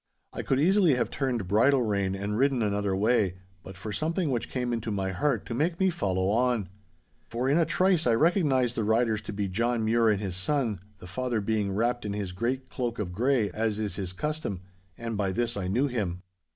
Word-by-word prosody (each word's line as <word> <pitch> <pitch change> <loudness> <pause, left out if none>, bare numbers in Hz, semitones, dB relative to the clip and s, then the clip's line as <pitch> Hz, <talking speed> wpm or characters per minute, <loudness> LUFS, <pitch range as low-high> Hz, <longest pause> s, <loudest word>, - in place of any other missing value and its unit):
I - - -3
could 135 - 0
easily 180 -1 +4
have 125 - -1
turned 125 -8 -1
bridle 125 +7 +4
rein 100 -3 0
and 100 +2 -3
ridden 130 0 +2
another 100 -2 0
way, 100 -2 +2 0.3
but 95 0 -11
for 105 +3 -6
something 165 - -1
which 120 -3 -2
came 125 -2 -2
into 115 -1 -3
my 95 -2 -1
heart 115 +4 0
to 120 - -5
make 165 +7 0
me 190 -1 +3
follow 95 - 0
on. 115 -3 +1 0.6
For 120 +3 -2
in 145 +5 +3
a 165 - +2
trice 170 0 +2
I 115 - +4
recognised 135 - +2
the 110 - 0
riders 110 0 +2
to 105 - -7
be 100 -1 -2
John 115 +4 0
Mure 115 0 +3
and 105 -2 +2
his 95 -3 -4
son, 115 0 -1 0.2
the - - -12
father 120 +5 -2
being 105 -2 -1
wrapped 120 +3 0
in 105 -1 -3
his 100 -3 -3
great 125 +7 -2
cloak 120 -3 -3
of 90 -4 -3
grey, 120 -1 +1
as 110 +1 -1
is 105 -2 -3
his 95 -3 -4
custom. 150 - -3 0.4
And 115 -1 -4
by 100 -2 0
this 120 +4 -1
I 95 -3 -3
knew 120 +9 +2
him. 100 -9 -2
115 Hz, 215 wpm, -28 LUFS, 100-130 Hz, 0.6 s, easily